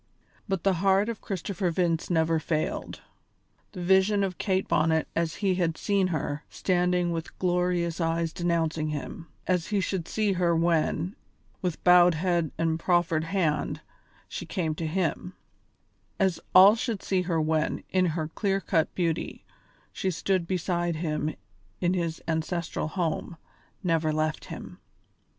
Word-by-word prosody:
But 195 -4 -1
the 195 - +3
heart 195 +2 +3
of 230 - -5
Christopher 190 -1 -2
Vince 165 -1 0
never 165 -1 +2
failed. 155 -1 -2 0.7
The 180 -3 -5
vision 190 +3 +4
of 185 -2 -3
Kate 190 -2 0
Bonnet 160 0 +2
as 165 -1 0
he 190 - +4
had 170 -3 0
seen 200 -2 +1
her, 150 -3 -3
standing 180 -1 +1
with 165 -1 -5
glorious 180 -1 0
eyes 165 0 0
denouncing 165 -3 0
him; 150 +2 -5 0.2
as 180 -3 0
he 205 -1 +1
should 185 -3 -2
see 215 -2 +1
her 175 -2 +2
when, 165 +2 +1 0.5
with 180 -4 -3
bowed 180 -1 +7
head 170 -1 +1
and 165 0 0
proffered 170 -2 +2
hand, 165 -5 0 0.5
she - - -6
came 160 -4 -1
to 160 +1 -3
him; 180 +1 -1 0.9
as 190 -3 +2 0.2
all 195 +3 +9
should 225 -3 -3
see 190 -1 +1
her 170 -2 0
when, 155 0 0
in 185 -1 +3
her 155 -1 -1
clear 195 +4 0
cut 165 -5 +1
beauty, 170 -3 -2 0.5
she 190 - -1
stood 185 0 0
beside 175 -2 -1
him 155 -1 -2 0.4
in 175 0 +1
his 170 -3 -2
ancestral 160 0 -2
home, 165 -1 -2 0.5
never 165 -3 +1
left 155 0 -1
him. - - -9
175 Hz, 145 wpm, -27 LUFS, 160-185 Hz, 0.9 s, all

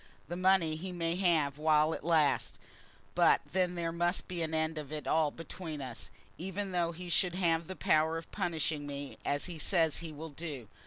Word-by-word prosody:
The 175 - -3
money 180 -4 +3
he 185 +3 -5
may 170 -1 -1
have 155 -6 +2
while 155 0 +4
it - - -6
lasts; 160 -4 +2 0.6
but - - +5
then 180 -1 0
there 170 -1 -1
must 175 +2 0
be 175 -2 -3
an 160 -1 -1
end 160 0 0
of 150 -1 -8
it 155 -1 -4
all 155 -1 +3
between 165 0 -7
us, 130 -4 -6 0.3
even 190 +2 -3
though 175 -2 +1
he 175 +2 -8
should 175 +1 +1
have 165 -3 +1
the 190 - -5
power 160 -4 +3
of 165 - -8
punishing 160 -6 -1
me, 140 -1 -6
as 145 0 0
he 175 -3 -6
says 165 -4 +2
he 165 -2 -6
will 155 +2 -7
do. 145 -6 -6
165 Hz, 200 wpm, -32 LUFS, 155-175 Hz, 0.6 s, but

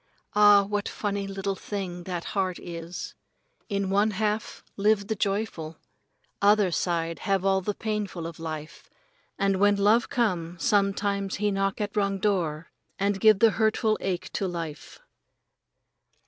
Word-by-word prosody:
Ah, 205 -1 +7
what 205 0 -2
funny 200 -1 -3
little 195 0 -2
thing 185 -3 -5
that 175 -2 -4
heart 190 -3 0
is! 170 0 -7 0.6
In 200 -2 -1
one 205 +2 +3
half 215 +1 -2
live 205 0 +2
the 220 +2 -2
joyful. 195 -6 -2 0.6
Other 205 -2 +4
side 165 -1 -1
have 195 -1 0
all 190 0 +3
the 205 +2 -2
painful 210 -6 -3
of 165 -1 -7
life, 155 -1 -7 0.5
and 195 -1 +1
when 205 +1 +5
the 200 - -1
love 225 +4 +4
come 180 -8 -1
sometimes 200 +1 +1
he 210 0 0
knock 195 0 -1
at 210 0 -3
wrong 200 -1 +1
door 175 -6 -1 0.3
and 200 0 0
give 215 -2 +7
the 225 +2 +5
hurtful 220 0 +2
ache 185 -2 -3
to 195 - -1
life. 165 -4 -6
195 Hz, 150 wpm, -27 LUFS, 180-205 Hz, 0.6 s, Ah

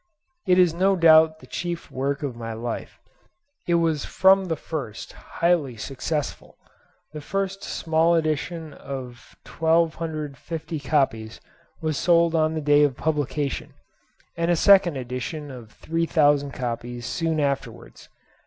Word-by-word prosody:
It 180 - +4
is 180 -3 +5
no 190 +3 +2
doubt 160 -2 +5
the - - -13
chief 175 -1 -5
work 140 +2 -2
of 135 -4 -3
my 115 -1 -6
life. 115 +1 -6 0.7
It 170 - +3
was 165 -3 +1
from 190 0 +4
the 165 -3 -1
first 145 -8 -6
highly 165 -8 -1
successful. 140 +5 -4 0.6
The 150 - -6
first 195 +4 -3
small 165 +1 +1
edition 160 0 -2
of 130 -3 -9
1250 160 -1 -1
copies 130 -6 -1 0.4
was 155 -2 -1
sold 170 -1 +3
on 160 -1 +1
the 155 - -2
day 145 0 +4
of 145 -4 +2
publication, 150 -2 -2 0.6
and 170 0 -1
a 175 - +4
second 185 -3 +5
edition 130 +4 -5
of 120 -4 -11
3000 145 -2 +1
copies 120 -1 -5
soon 160 +3 -1
afterwards. 140 -5 -4
155 Hz, 130 wpm, -24 LUFS, 135-165 Hz, 0.7 s, is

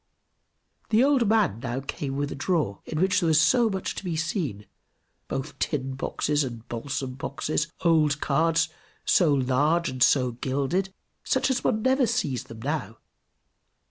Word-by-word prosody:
The 225 +2 +4
old 270 -5 +3
man 215 - +2
now 120 +2 -3
came 135 0 -4
with 145 0 -2
a - - -4
drawer, 145 - -1
in 155 - -4
which 185 +1 +3
there 170 - 0
was 160 +5 +5
much 225 -7 +1
to - - -7
be 175 -3 -2
seen, 155 - -2 0.6
both 135 +3 -5
"tin 135 -3 -1
boxes" 145 +2 -1
and 115 -3 -7
"balsam 130 +2 -4
boxes," 145 +3 -2
old 155 -4 +3
cards, 165 +3 +2 0.4
so 170 -5 +4
large 145 +5 +2
and 130 -1 -7
so 125 -1 +4
gilded, 140 +10 -1 0.3
such - - +1
as 260 - -1
one 215 -2 +1
never 260 -1 +3
sees 155 - -1
them 115 -1 -11
now. 135 -7 -3
150 Hz, 155 wpm, -26 LUFS, 130-180 Hz, 0.6 s, was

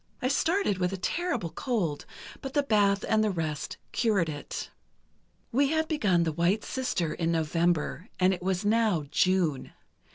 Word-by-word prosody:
I 255 - 0
started 320 - +1
with 180 0 +1
a - - -2
terrible 245 - -2
cold, 190 - -2 0.3
but 270 -1 -6
the 290 - +3
bath 205 -5 +2
and 215 0 +3
the 215 - +2
rest 160 -6 -3
cured 205 -8 +1
it. 145 -1 -6 0.8
"We 275 +4 +3
had 315 +2 0
begun 205 - +2
'The 160 - 0
White 175 +7 +1
Sister' 195 -11 -2
in 165 -1 -1
November, 165 +3 0
and 185 +1 +4
it 180 - -5
was 190 +2 -1
now 215 -6 +2
June. 165 -8 +1
190 Hz, 160 wpm, -28 LUFS, 170-230 Hz, 0.8 s, and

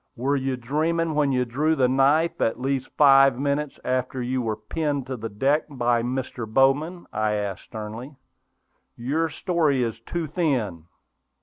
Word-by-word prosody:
"Were 135 +4 0
you 135 -1 -1
dreaming 160 +6 0
when 145 -2 +2
you 125 -1 +1
drew 150 +7 +1
the 130 -4 +3
knife, 140 +6 +2
at 115 - +1
least 135 0 -2
five 135 -3 +6
minutes 140 +1 -2
after 130 0 -1
you 125 +1 -1
were 110 -2 -1
pinned 140 +5 -3
to 130 0 -4
the 115 -1 -6
deck 135 +9 +1
by 120 -4 +1
Mr. 120 -2 -4
Bowman?" 145 +8 +2
I 110 0 0
asked, 100 -3 -3
sternly. 110 +5 -8 0.8
"Your 150 +7 -1
story 155 -6 +1
is 115 -1 -3
too 165 +8 -4
thin." 130 - -1
135 Hz, 160 wpm, -24 LUFS, 120-150 Hz, 0.8 s, five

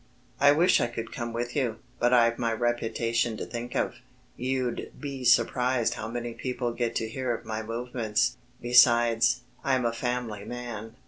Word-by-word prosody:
I 145 +1 +7
wish 165 +5 +4
I - - +2
could 115 -1 -6
come 120 -2 -4
with 120 +1 -4
you. 125 -7 0 0.2
But 120 0 +3
I've 115 -2 +4
my 115 -2 0
reputation 115 0 0
to - - -4
think 120 0 -6
of. - - 0 0.4
You'd 130 -1 -2
be 140 -3 -5
surprised 125 0 +3
how 105 - -5 0.3
people 125 -2 -2
get 120 -1 -2
to 110 - -1
hear 125 +2 -3
of - - -10
my 110 0 -3
movements. 120 +1 -1 0.2
Besides, 120 0 +5 0.2
I'm 130 -2 +1
a 115 - +1
family 120 -3 -3
man." 115 -1 -7
120 Hz, 165 wpm, -27 LUFS, 115-125 Hz, 0.4 s, I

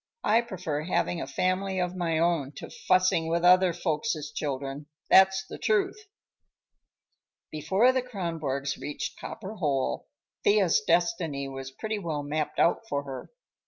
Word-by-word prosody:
I 225 +2 +4
prefer 180 -9 -4
having 170 +1 -1
a - - -4
family 185 +6 -1
of 180 0 -1
my 170 -3 0
own 160 -4 +1
to - - -9
fussing 185 -3 +2
with 170 +1 0
other 185 0 +6
folks' 155 -2 -2
children, 140 0 -4 0.2
that's 190 0 +6
the - - -9
truth." 220 - 0 1.4
Before 190 - +3
the 260 0 0
Kronborgs 165 - -3
reached 150 - -5
Copper 210 -1 -7
Hole, 135 - -1 0.4
Thea's 200 -5 +4
destiny 165 -4 0
was 135 0 -6
pretty 215 +10 -4
well 155 -6 -3
mapped 150 +1 -2
out 170 - +3
for 140 0 -1
her. 135 -2 -7
170 Hz, 140 wpm, -28 LUFS, 145-190 Hz, 1.4 s, other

